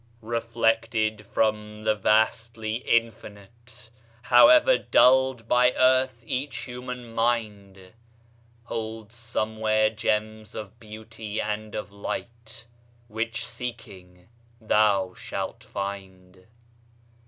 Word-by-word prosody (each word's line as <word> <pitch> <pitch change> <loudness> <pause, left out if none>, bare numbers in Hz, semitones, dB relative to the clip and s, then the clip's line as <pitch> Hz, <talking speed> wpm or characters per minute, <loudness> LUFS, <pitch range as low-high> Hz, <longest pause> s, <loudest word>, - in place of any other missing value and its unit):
Reflected 115 -2 0
from 105 -1 -1
the 110 0 +3
vastly 110 +1 +1
Infinite, 115 0 -3 0.3
However 310 - +7
dulled 130 -2 +3
by 125 +1 +4
earth, 130 -1 +2
each 130 +4 -3
human 125 -1 -8
mind 105 -5 -2 0.7
Holds 110 -1 -6
somewhere 110 -2 0
gems 110 0 -2
of 110 +2 -8
beauty 110 -1 -7
and 105 0 -4
of 105 - -5
light 115 +2 -7 0.4
Which, 115 +1 -3
seeking, 95 -8 -9 0.3
thou 105 -4 +2
shalt - - -6
find. 95 -2 -7
110 Hz, 85 wpm, -25 LUFS, 105-115 Hz, 0.7 s, However